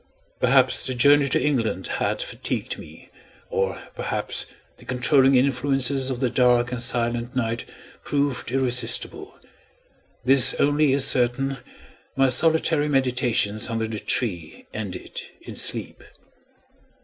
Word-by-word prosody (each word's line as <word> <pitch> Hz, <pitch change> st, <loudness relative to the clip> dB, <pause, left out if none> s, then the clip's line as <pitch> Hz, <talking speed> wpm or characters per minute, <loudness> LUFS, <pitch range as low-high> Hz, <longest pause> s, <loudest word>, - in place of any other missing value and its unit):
Perhaps 130 Hz, 0 st, +2 dB
the 130 Hz, -, -3 dB
journey 140 Hz, +3 st, +4 dB
to -, -, +1 dB
England 115 Hz, -10 st, -1 dB, 0.2 s
had -, -, -1 dB
fatigued -, -, -5 dB
me, -, -, -14 dB, 0.4 s
or 95 Hz, 0 st, -2 dB
perhaps -, -, -2 dB, 0.3 s
the -, -, -18 dB
controlling 130 Hz, +1 st, +2 dB
influences 135 Hz, +1 st, +1 dB
of 130 Hz, -2 st, -4 dB
the 130 Hz, -, +1 dB
dark 125 Hz, -1 st, +2 dB
and 125 Hz, -2 st, -3 dB
silent 120 Hz, -1 st, 0 dB
night 115 Hz, -2 st, -2 dB, 0.4 s
proved 140 Hz, -4 st, -2 dB
irresistible. 130 Hz, -, -2 dB, 0.9 s
This 130 Hz, -1 st, +8 dB
only 145 Hz, 0 st, +2 dB
is 135 Hz, 0 st, +2 dB
certain: 135 Hz, +2 st, +1 dB, 0.6 s
my 135 Hz, -1 st, +3 dB
solitary 160 Hz, +2 st, +2 dB
meditations 125 Hz, -5 st, 0 dB
under 115 Hz, -1 st, -2 dB
the 110 Hz, -1 st, -5 dB
tree 90 Hz, -12 st, -2 dB
ended 100 Hz, -4 st, -7 dB, 0.2 s
in -, -, -10 dB
sleep. -, -, -2 dB
125 Hz, 120 wpm, -23 LUFS, 120-135 Hz, 0.9 s, This